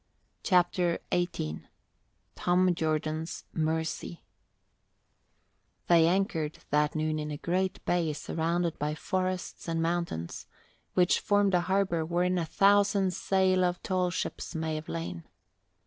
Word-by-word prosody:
CHAPTER 175 -2 +2 0.2
XVIII 170 - -1 0.7
TOM 180 0 +2
JORDAN'S 155 0 -2
MERCY 160 +1 -2 1.6
They 165 -2 +5
anchored 170 -4 0
that 150 +1 +2
noon 155 0 0
in 150 0 -4
a 150 - -4
great 185 +4 -1
bay 170 -3 +1
surrounded 165 +2 -1
by 150 +1 -1
forests 185 +2 -3
and 165 0 -1
mountains, 165 - -2 0.5
which 180 -1 +4
formed 205 -1 +2
a 180 - +4
harbour 185 -2 +1
wherein 175 +2 +1
a 165 - -1
thousand 200 0 +3
sail 185 0 +2
of 180 0 -1
tall 185 -1 +1
ships 175 - -4
might 160 0 -2
have 155 0 -4
lain. 90 - -4
175 Hz, 120 wpm, -29 LUFS, 160-185 Hz, 1.6 s, They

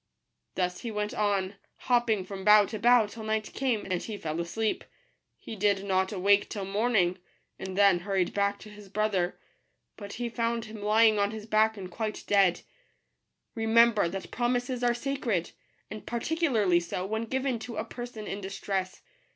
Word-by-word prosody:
Thus 180 -1 -1
he 235 - -5
went 210 +1 -3
on, 200 -3 0 0.2
hopping 235 -6 +1
from 190 0 -7
bough 210 +1 +7
to 215 +1 -6
bough, 240 0 +5
till 220 +2 -10
night 215 0 -2
came, 250 -5 -1
and 185 -2 -2
he 215 -2 -6
fell 160 -3 -4
asleep. 215 +6 -2 0.5
He 225 - -8
did 200 -1 +1
not 190 -1 +1
awake 200 +1 +3
till 200 -3 -4
morning, 195 -3 +1 0.4
and 190 0 -6
then 200 -3 +5
hurried 190 -1 -1
back 200 0 +1
to 215 - -11
his 210 -1 -13
brother; 200 -3 0 0.6
but 200 -2 -8
he 240 +1 -3
found 230 0 -2
him 215 -1 -9
lying 215 +1 +4
on 200 0 +2
his 215 -1 -7
back 220 0 +2
and 185 -2 -7
quite 215 +2 -4
dead. 195 -3 +3 0.9
Remember 225 -3 +4
that 190 +2 -6
promises 245 +1 -1
are 240 0 +3
sacred; 240 -8 -2 0.4
and 215 - -7
par 235 - -2
ticularly 230 - +2
so 175 +2 -4
when 220 +3 -2
given 260 0 -1
to 225 +1 -7
a - - -2
person 240 -3 -7
in 200 0 -5
distress. 190 -1 -4
210 Hz, 175 wpm, -28 LUFS, 195-230 Hz, 0.9 s, bough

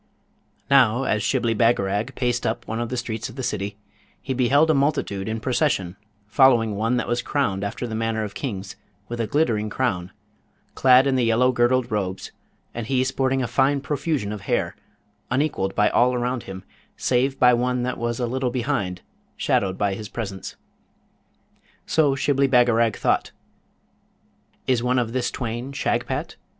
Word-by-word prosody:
Now 130 -3 +4
as 105 -5 0
Shibli 120 0 +1
Bagarag 110 +1 +1
paced 120 -1 0
up 120 - -3
one 115 - -3
of 120 -1 -3
the 125 - -3
streets 115 -2 -4
of 120 - -12
the 130 - -5
city, 100 -2 -3 0.4
he 130 - -4
beheld 140 +5 +3
a - - +3
multitude 135 -9 0
in 110 +1 -2
procession 120 - 0 0.3
following 115 0 +4
one 115 +4 0
that 120 - -2
was 120 0 0
crowned 100 -10 -1
after 100 +4 -4
the 115 - -5
manner 110 0 -1
of 105 -2 -6
kings, 100 -8 -5 0.3
with 120 0 -4
a 115 - -1
glittering 115 -8 +1
crown, 100 -7 -2 0.6
clad 130 0 +5
in 135 -1 +2
the 125 - +2
yellow 120 +3 +3
girdled 125 0 +1
robes, 95 -3 -3 0.4
and 115 -2 -5
he 130 0 +2
sporting 130 0 0
a - - -1
fine 135 +4 +2
profusion 140 -5 -2
of 105 -2 -6
hair, - - -1 0.5
unequalled 125 -8 -1
by 105 - +3
all 125 +1 +3
around 125 0 -1
him, 95 -1 -7 0.3
save 130 +2 +1
by 125 -1 +5
one 125 +1 0
that 125 0 -3
was 120 +1 -2
a 125 - 0
little 130 +1 -1
behind, 120 -8 -2 0.3
shadowed 95 -1 0
by 100 -1 0
his 105 +1 -7
presence. 100 -5 -6 1.3
So 150 -4 +2
Shibli 140 0 +2
Bagarag 120 -3 +3
thought, - - 0 1.4
'Is 125 -3 +1
one 125 +1 +1
of 120 -2 -1
this 125 -1 0
twain 120 +2 -4
Shagpat? - - -2
120 Hz, 165 wpm, -23 LUFS, 110-130 Hz, 1.4 s, clad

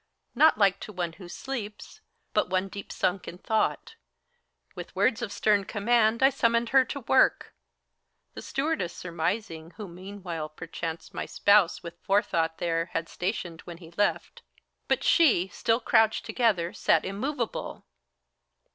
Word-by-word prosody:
Not 305 +2 +5
like 195 -2 +3
to - - -8
one 175 -4 -3
who 180 0 -12
sleeps, 215 -3 -7 0.3
but - - +1
one 185 +1 0
deep 200 +1 -8
sunk 185 0 -1
in 175 - -7
thought. 220 - -1 0.8
With - - -9
words 235 -3 +2
of 200 - -4
stern 205 0 +2
command 225 +3 +2
I 270 - +6
summoned 235 -1 +1
her 265 0 +5
to 280 +3 -6
work, 260 +2 +2 0.8
The - - -8
stewardess 275 - -2
surmising, 170 -1 -3
who 210 -3 -6
meanwhile, 180 -3 -7
perchance, 165 +1 -6
My - - -4
spouse 200 -4 +3
with 170 0 -9
forethought 170 -5 +1
there 165 -1 0
had 165 - -2
stationed 180 -3 -4
when 170 -1 -8
he 165 -2 -13
left; 205 - -1 0.5
But - - +1
she, 240 - +4
still 225 +6 0
crouched 225 -2 +2
together, 195 -9 +1
sat 160 - +2
immovable. 235 +10 -4
200 Hz, 145 wpm, -27 LUFS, 170-230 Hz, 0.8 s, I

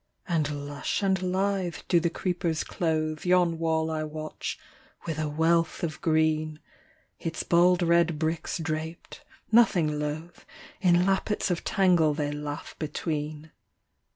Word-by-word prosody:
And 150 -4 -1
lush 145 +7 -2
and 190 -1 +2
lithe 185 -1 0
do 175 - +4
the 170 0 +1
creepers 170 -2 -1
clothe 155 -2 -1
Yon 180 -2 +3
wall 160 -1 +1
I 155 -1 -1
watch, 155 0 -5 0.5
with 160 -2 -3
a 155 -1 -1
wealth 165 +3 +1
of 160 -2 -3
green: 155 -1 +1 0.6
Its 165 -1 -3
bald 175 +1 +4
red 170 -1 +3
bricks 160 +1 -2
draped, 160 0 -5 0.3
nothing 175 -10 +4
loath, 155 +3 -5 0.4
In 180 -2 +4
lappets 195 +1 0
of 175 - -1
tangle 175 -6 +3
they 145 -1 -1
laugh 145 0 -6
between. 155 0 -4
160 Hz, 130 wpm, -27 LUFS, 155-175 Hz, 0.6 s, do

